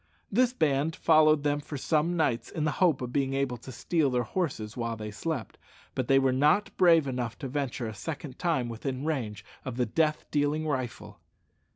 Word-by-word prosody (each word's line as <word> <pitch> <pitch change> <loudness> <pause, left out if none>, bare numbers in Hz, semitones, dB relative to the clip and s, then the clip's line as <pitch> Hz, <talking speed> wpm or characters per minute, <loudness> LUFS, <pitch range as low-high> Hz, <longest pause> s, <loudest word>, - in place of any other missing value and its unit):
This 245 +4 +3
band 155 - +1
followed 155 -2 +4
them 145 0 +1
for 145 0 -6
some 160 +5 +1
nights, 125 -7 0
in 155 - -3
the 150 - +1
hope 165 -8 +4
of 125 0 -5
being 135 -1 0
able 135 -3 -1
to 130 +3 -10
steal 155 +4 +1
their 125 -1 +1
horses 115 - -3
while 115 -2 -3
they 105 0 -6
slept; 140 +3 -4 0.3
but 130 - -2
they 135 - +5
were 135 -1 +3
not 150 +10 +2
brave 165 -4 +5
enough 125 -4 -3
to 135 - -5
venture 135 -2 -2
a 110 - -4
second 145 +3 -6
time 160 -9 +1
within 130 +4 -4
range 110 -10 -3 0.2
of 130 -2 -5
the 125 - +2
death 155 +6 0
dealing 150 +1 +1
rifle. 130 -5 -4
140 Hz, 195 wpm, -28 LUFS, 125-155 Hz, 0.3 s, they